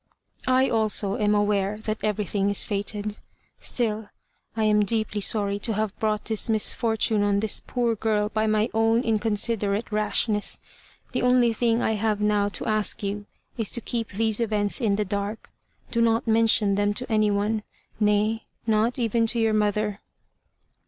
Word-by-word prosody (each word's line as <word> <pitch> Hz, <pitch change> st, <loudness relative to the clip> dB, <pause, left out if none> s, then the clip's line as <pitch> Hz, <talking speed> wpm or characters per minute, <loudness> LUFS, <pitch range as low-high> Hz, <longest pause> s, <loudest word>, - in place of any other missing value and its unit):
"I, 255 Hz, +1 st, +3 dB
also, 215 Hz, -3 st, +1 dB
am 210 Hz, 0 st, +2 dB
aware 205 Hz, 0 st, +1 dB
that 215 Hz, 0 st, -5 dB
everything 205 Hz, -1 st, -1 dB
is 200 Hz, -, +1 dB
fated. 205 Hz, 0 st, -3 dB, 0.4 s
Still, 220 Hz, -3 st, -1 dB, 0.5 s
I 220 Hz, -, +1 dB
am 210 Hz, -1 st, +3 dB
deeply 215 Hz, 0 st, 0 dB
sorry 200 Hz, 0 st, +2 dB
to 225 Hz, +2 st, -2 dB
have 215 Hz, -1 st, -2 dB
brought 215 Hz, -1 st, -1 dB
this 220 Hz, 0 st, -1 dB
misfortune 220 Hz, 0 st, +1 dB
on 205 Hz, 0 st, +2 dB
this 215 Hz, 0 st, 0 dB
poor 240 Hz, -2 st, 0 dB
girl 210 Hz, -1 st, 0 dB
by 215 Hz, 0 st, 0 dB
my 215 Hz, +2 st, +1 dB
own 225 Hz, +2 st, +2 dB
inconsiderate 215 Hz, -1 st, 0 dB
rashness. 210 Hz, 0 st, 0 dB, 0.5 s
The -, -, -1 dB
only 250 Hz, -2 st, +3 dB
thing 230 Hz, +1 st, +1 dB
I -, -, +1 dB
have 215 Hz, -1 st, 0 dB
now 210 Hz, -1 st, +1 dB
to -, -, -5 dB
ask 215 Hz, -1 st, 0 dB
you, 205 Hz, +1 st, -4 dB, 0.3 s
is 220 Hz, -, +1 dB
to 240 Hz, -, 0 dB
keep 230 Hz, -2 st, -3 dB
these 220 Hz, +2 st, +1 dB
events 210 Hz, 0 st, 0 dB
in 210 Hz, -4 st, +2 dB
the 210 Hz, +1 st, -1 dB
dark. 200 Hz, +2 st, -4 dB, 0.4 s
Do 235 Hz, -, +1 dB
not 230 Hz, 0 st, +2 dB
mention 220 Hz, -2 st, +3 dB
them 205 Hz, +1 st, 0 dB
to 250 Hz, +1 st, -3 dB
any 215 Hz, -1 st, +3 dB
one 205 Hz, +2 st, 0 dB, 0.4 s
nay, 210 Hz, +1 st, +1 dB, 0.2 s
not 225 Hz, +2 st, +1 dB
even 230 Hz, -1 st, +1 dB
to 235 Hz, +1 st, +1 dB
your 225 Hz, -1 st, +2 dB
mother." 210 Hz, -1 st, 0 dB
215 Hz, 165 wpm, -25 LUFS, 205-225 Hz, 0.5 s, I